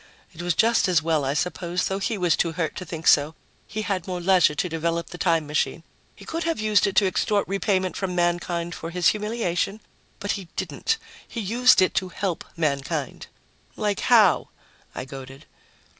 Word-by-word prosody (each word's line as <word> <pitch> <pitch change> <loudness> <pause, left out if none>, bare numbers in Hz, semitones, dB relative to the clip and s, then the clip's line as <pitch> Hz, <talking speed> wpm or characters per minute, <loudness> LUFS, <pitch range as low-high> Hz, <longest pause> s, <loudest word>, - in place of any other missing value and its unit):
It 165 - -8
was 175 -2 0
just 230 +3 +3
as 170 -4 +2
well, 160 -3 +1
I 135 +1 -1
suppose, 175 +1 -1
though 195 0 -2
he 215 +2 -1
was 175 -4 +2
too 165 -1 0
hurt 160 -1 -2
to 185 - -5
think 165 -1 -7
so; 150 +2 +4 0.3
he 215 0 -4
had 190 -4 -2
more 180 -1 -3
leisure 180 -4 +4
to 180 - 0
develop 170 +1 -2
the 175 - -8
time 165 -3 +2
machine. 150 +2 -1 0.3
He - - -13
could 330 +1 -3
have 330 -4 -1
used 215 -1 +3
it 195 - -3
to 205 - +5
extort 200 +2 +1
repayment 190 -1 0
from 185 -2 -3
mankind 175 0 0
for 165 - -6
his 175 -3 +3
humiliation, 210 -2 -1 0.4
but 200 - -2
he 195 -3 -4
didn't. 450 0 -1 0.3
He 235 - -6
used 235 +2 +4
it 185 - +1
to 185 -1 -1
help 185 -2 -3
mankind." 140 -4 -2 0.5
"Like 210 -2 0
how?" 220 -7 +4 0.5
I 125 - -4
goaded. 135 +1 -10
180 Hz, 190 wpm, -24 LUFS, 165-200 Hz, 0.5 s, to